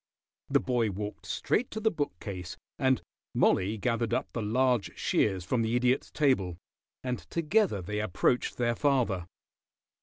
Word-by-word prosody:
The - - +4
boy 120 -4 +1
walked 105 +2 -5
straight 245 - 0
to 220 - -4
the 220 0 +2
bookcase, 95 - -4 0.2
and 130 -1 +2 0.3
Mollie 100 +4 +3
gathered 115 +1 0
up - - -3
the 115 - -2
large 125 +1 +1
shears 95 -4 +1
from 120 +6 +1
the 115 +1 0
Idiot's 125 +2 +2
table, 115 - +1 0.5
and 125 -3 -2
together 170 - +1
they 105 +4 -3
approached 110 +4 +1
their 120 -1 +1
father. 115 -11 +1
120 Hz, 145 wpm, -29 LUFS, 100-130 Hz, 0.5 s, The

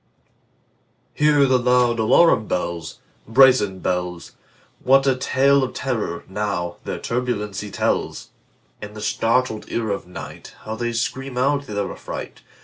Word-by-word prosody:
Hear 150 -1 +4
the 130 -1 +3
loud 125 -1 +2
alarum 110 0 +4
bells, 85 -4 -3 0.3
Brazen 115 -5 +5
bells! 90 -1 -3 0.5
What 135 +1 +4
a 135 -1 +3
tale 135 +2 +3
of 130 - -4
terror, 110 -10 -3
now, 95 -4 -3
their - - -3
turbulency 105 -4 -3
tells! - - -2 0.5
In 105 0 -8
the 105 - -8
startled 115 +1 0
ear 110 -3 -1
of 100 - -3
nightHow 110 +4 -9
they 120 -1 -2
scream 130 +3 -3
out 140 +2 +1
their 100 -1 -3
affright! - - -8
115 Hz, 130 wpm, -22 LUFS, 105-130 Hz, 0.5 s, Brazen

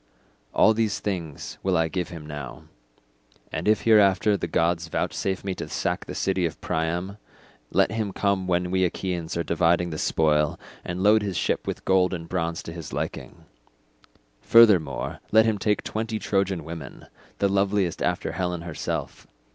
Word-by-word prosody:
"All 110 - +5
these 110 -2 0
things 85 -8 -5
will 95 -2 +1
I 80 0 +2
give 90 0 -3
him 80 -4 -9
now, 75 -5 -7 0.9
and - - -3
if 110 0 +3
hereafter 105 -2 +5
the 90 - -3
gods 85 +1 +1
vouchsafe 95 +3 -2
me 95 -1 -2
to - - -7
sack - - -2
the - - -7
city 95 -1 0
of 80 - -9
Priam, 85 +5 -2 0.5
let - - +2
him 110 -2 -2
come 100 -1 0
when 90 0 0
we 95 0 +2
Achaeans 90 -2 -2
are 85 - 0
dividing 85 +1 +2
the 75 - -4
spoil, 75 -1 +1 0.2
and 90 +1 -4
load 105 +1 +5
his 100 -3 -3
ship - - -1
with - - -4
gold 95 -1 +3
and 85 -1 -7
bronze 85 -2 -2
to 80 - -7
his 85 -3 -8
liking; - - -5 1.0
furthermore 100 - +4
let 110 +1 +6
him 110 -2 +1
take 105 0 0
twenty 110 0 -3
Trojan 95 -5 0
women, 80 -3 -8 0.3
the 100 - +2
loveliest 100 -2 +1
after - - -1
Helen 90 0 -2
herself. 85 -2 -5
90 Hz, 165 wpm, -25 LUFS, 85-100 Hz, 1.0 s, let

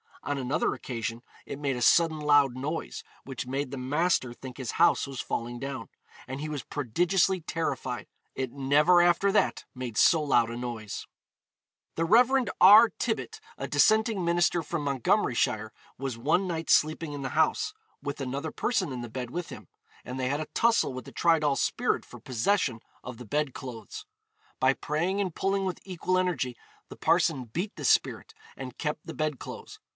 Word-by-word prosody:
On 145 - -2
another 130 0 0
occasion, 115 -1 -5 0.2
it 140 - -6
made 140 -3 -1
a 125 - -5
sudden 160 +5 +4
loud 145 -3 +4
noise, 150 +5 -4 0.2
which 130 -2 -6
made 135 +1 -3
the 140 - -5
master 135 0 0
think 130 0 -10
his 130 -4 -4
house 170 -3 +3
was 135 -2 -7
falling 120 +1 -3
down, 130 -5 -5 0.4
and 130 +2 -5
he 155 +1 -4
was 150 -3 -4
prodigiously 175 - +1
terrified; 135 -6 -3 0.3
it 130 -2 -3
never 150 +6 +4
after 175 +3 +3
that 210 - +1
made 125 -4 -5
so 165 -3 +5
loud 120 -5 +3
a 120 - -5
noise. 120 -4 -6 0.9
The 165 - 0
Rev. 250 +7 +5
R. 205 +5 +9
Tibbet, 345 - -2 0.2
a - - -4
dissenting 220 -3 +3
minister 175 0 +2
from 160 0 -4
Montgomeryshire, 110 -4 +1 0.3
was 130 -3 -4
one 160 +10 +1
night 165 -2 -4
sleeping 155 0 +2
in 140 -1 -5
the 130 - -2
house, - - +1 0.3
with 140 0 -5
another 140 +4 -3
person 195 - -1
in 125 -2 -5
the 120 - -7
bed 125 +1 -5
with 175 +2 -4
him; - - -10 0.4
and 125 +1 -6
they 130 -1 0
had 145 +2 -1
a 155 - -5
tussle 230 - +3
with 130 -2 -7
the - - -10
Tridoll 155 -4 +2
spirit - - 0
for - - -12
possession 130 - 0 0.2
of 125 -1 -8
the 125 - -10
bed 145 +3 -1
clothes. 130 - -8 0.5
By 130 +1 +4
praying 170 +8 -1
and 190 -4 -1
pulling 195 +2 0
with 185 - -3
equal 185 0 -1
energy, 150 -10 -1 0.3
the - - -9
parson 130 -2 +2
beat 175 - -4
the - - -6
spirit, - - +1 0.2
and 130 -2 -8
kept 150 -1 -3
the - - -7
bed 155 -3 -2
clothes. - - -9
145 Hz, 180 wpm, -28 LUFS, 130-175 Hz, 0.9 s, R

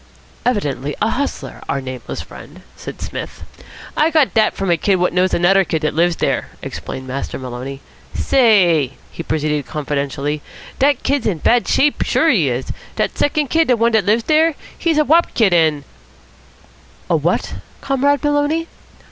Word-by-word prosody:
"Evidently 145 - -1
a 220 +2 +1
hustler, 280 +2 -4
our 140 - 0
nameless 130 -1 -6
friend," - - -13
said - - -9
Psmith. - - -7 0.5
"I 305 +2 +3
got 310 -4 +2
dat 220 -2 +2
from 195 -2 -1
a 170 - +3
kid 195 +4 +2
what 180 -1 0
knows 185 +1 +2
anuder 190 +3 +4
kid 160 -2 -3
what 155 - 0
lives 170 +2 +2
dere," - - -1 0.2
explained 130 0 -6
Master 130 +2 -4
Maloney. 130 +2 -7 0.3
"Say," 180 - +3 0.2
he - - -7
proceeded 150 -3 -1
confidentially, 145 0 -3 0.4
"dat 275 -1 +2
kid's 280 -2 0
in 195 -6 0
bad, 235 +9 +2
sure 295 +2 +2
he 175 - +3
is. 125 +1 -3 0.2
Dat - - -1
second 290 -1 0
kid, 325 0 +3
de 250 - +3
one 230 +1 +2
what 220 -4 +2
lives 220 +3 +2
dere. 315 +2 +3 0.2
He's 330 -3 0
a 305 - +3
wop 330 +4 +3
kid, 210 -6 +3
an 155 -4 +2 0.6
" - - -28
"A - - +4
what, - - 0 0.3
Comrade 280 +2 +1
Maloney?" 295 +3 +1
195 Hz, 165 wpm, -18 LUFS, -, 0.6 s, anuder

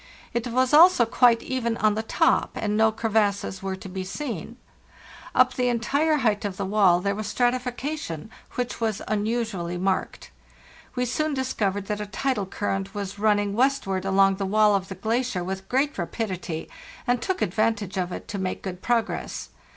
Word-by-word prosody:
It 235 +1 -1
was 255 +3 +1
also 320 -5 +7
quite 235 0 +4
even 235 -3 -1
on 215 -1 +3
the 215 - -1
top, 220 - +2
and 210 -1 -1
no 220 +1 +4
crevasses 210 -3 0
were 195 0 -3
to 190 - -10
be 190 0 -4
seen. 230 - -5 0.8
Up 255 0 +5
the 250 -1 0
entire 280 +7 +1
height 210 -2 +2
of 200 -2 -3
the - - -2
wall 190 -3 +4
there 200 +1 0
was 215 +1 -4
strati 245 0 +2
fication, 250 - -5 0.3
which 250 -1 -3
was 220 -3 -1
unusually 210 -5 -1
marked. 190 +1 -2 0.6
We 250 0 0
soon 305 +4 -1
dis 260 -1 -2
covered 200 -1 -1
that 210 +1 -3
a 210 - -4
tidal 205 -1 -1
current 195 0 -3
was 200 0 -5
running 205 -1 +2
westward 230 -6 +1
along 195 0 +3
the 195 - -2
wall 210 +1 +4
of 190 -1 0
the 190 - -7
glacier 220 -1 -1
with 190 +1 -5
great 275 +3 +1
rapidity, 175 -3 -3 0.4
and 245 0 +1
took 380 -1 -1
ad 175 - -2
vantage 215 -3 0
of 180 -1 -1
it - - -6
to 200 - -3
make 185 -1 -3
good 185 -2 -6
progress. 235 -2 -1
215 Hz, 180 wpm, -25 LUFS, 195-245 Hz, 0.8 s, also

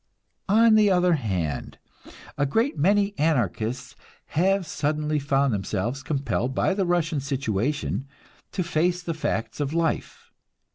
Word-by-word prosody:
On 225 +2 +6
the 215 -1 +5
other 180 -1 +3
hand, 95 - -2 0.6
a 140 - +1
great 225 - +1
many 200 +6 +2
Anarchists 125 - -1 0.3
have 190 +3 +2
suddenly 150 0 -1
found 140 -2 +1
themselves 105 +6 -2
compelled 135 -3 -2
by 195 - +2
the 190 -2 0
Russian 165 -3 +1
situation 135 +1 -2 0.4
to 185 - -1
face 175 +2 0
the 170 - -2
facts 155 -6 -3
of 145 +2 -2
life. 165 -1 -2
150 Hz, 130 wpm, -25 LUFS, 135-180 Hz, 0.6 s, On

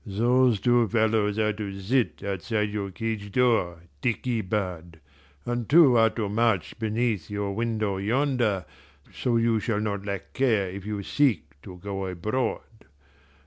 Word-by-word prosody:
"Those 120 +2 +2
two 120 0 +3
fellows 110 -1 +1
are 105 -1 +1
to 100 -2 -6
sit 120 +5 0
outside 105 +2 -2
your 100 -2 -3
cage 105 0 -4
door, 100 -9 +1 0.2
dickey 120 0 -1
bird, 90 -5 -4 0.5
and 120 -2 -3
two 145 -4 +7
are 115 -1 +5
to 110 -2 -3
march 105 -4 0
beneath 110 -5 -1
your 100 -1 -3
window 110 -2 -1
yonder, 115 - 0 0.5
so 120 -2 0
you 115 -1 +2
shall 110 -1 -1
not 100 -2 -2
lack 100 -1 -5
care 115 -8 +2
if 100 +1 -8
you 105 -2 -3
seek 110 - +1
to 90 +3 -10
go 95 0 -4
abroad. 105 +8 -2
105 Hz, 145 wpm, -26 LUFS, 100-120 Hz, 0.5 s, two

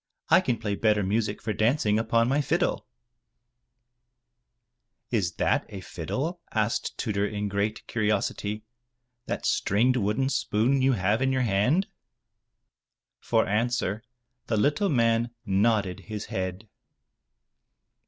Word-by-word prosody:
*' - - -59
I - - +6
can 120 - 0
play 105 -2 -3
better 105 0 +2
music 105 +2 -1
for 110 0 -1
dancing 110 -1 +2
upon 115 +1 +2
my 140 +3 +2
fiddle/* 160 0 0 2.2
"Is 95 -8 0
that - - +1
a 100 - -7
fiddle/' 135 - -4
asked 110 0 -1
Tudur 100 -3 -1
in 105 0 -3
great 100 +2 -2
curiosity, 105 -1 -1 0.6
"that - - -3
stringed 120 +6 +2
wooden 110 +5 0
spoon 130 -1 +1
you 130 0 +4
have 105 +2 +1
in 135 0 +2
your 130 -1 +1
hand?" 120 - +2 1.3
For - - +1
answer 115 0 0 0.5
the 110 - 0
little 145 - +2
man 115 -2 +1
nodded 100 -2 +1
his 105 -1 -6
head. 95 +3 -3
110 Hz, 125 wpm, -27 LUFS, 105-125 Hz, 2.2 s, I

